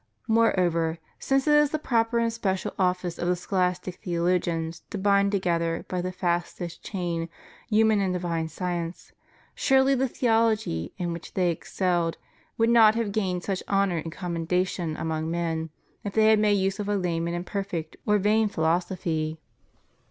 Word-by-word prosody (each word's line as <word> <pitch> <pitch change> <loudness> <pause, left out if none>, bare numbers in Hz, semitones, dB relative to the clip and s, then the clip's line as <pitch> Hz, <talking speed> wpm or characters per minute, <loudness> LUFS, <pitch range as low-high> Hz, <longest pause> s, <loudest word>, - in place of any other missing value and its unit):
Moreover, 175 -8 +2 0.2
since 270 0 +1
it 300 - +4
is 295 -1 +5
the 310 - -1
proper 235 -5 +1
and 230 -1 +1
special 190 -4 -2
office 180 -2 0
of 175 - -1
the 180 - +2
scholastic 180 0 -1
theologians 170 -2 -1
to - - -4
bind 200 0 +3
together 170 -4 0
by 180 -1 -2
the 185 +1 -3
fastest 175 -1 -2
chain 170 -4 -3 0.4
human 220 -1 +4
and 190 -2 0
divine 170 -3 -2
science, 170 +1 -4 0.4
surely 270 0 +3
the 265 0 +1
theology 225 - +1
in 175 -1 -2
which 170 - -9
they 180 -2 +2
excelled 170 0 -1 0.4
would 230 +1 +3
not 220 -2 +7
have 230 -3 -1
gained 185 -4 -1
such 195 -2 -2
honor 195 -3 +2
and 160 0 -4
commendation 175 -1 -2
among 160 0 -2
men 165 -1 -2 0.3
if 205 - -4
they 220 0 +5
had 215 - +5
made 210 -1 +3
use 195 0 0
of 205 0 -3
a 205 - +2
lame 170 -3 -1
and 170 - -2
imperfect 175 -2 -4
or 210 0 +4
vain 210 +2 +2
phi 160 -5 -3
losophy. 165 -2 0
180 Hz, 165 wpm, -26 LUFS, 170-210 Hz, 0.4 s, not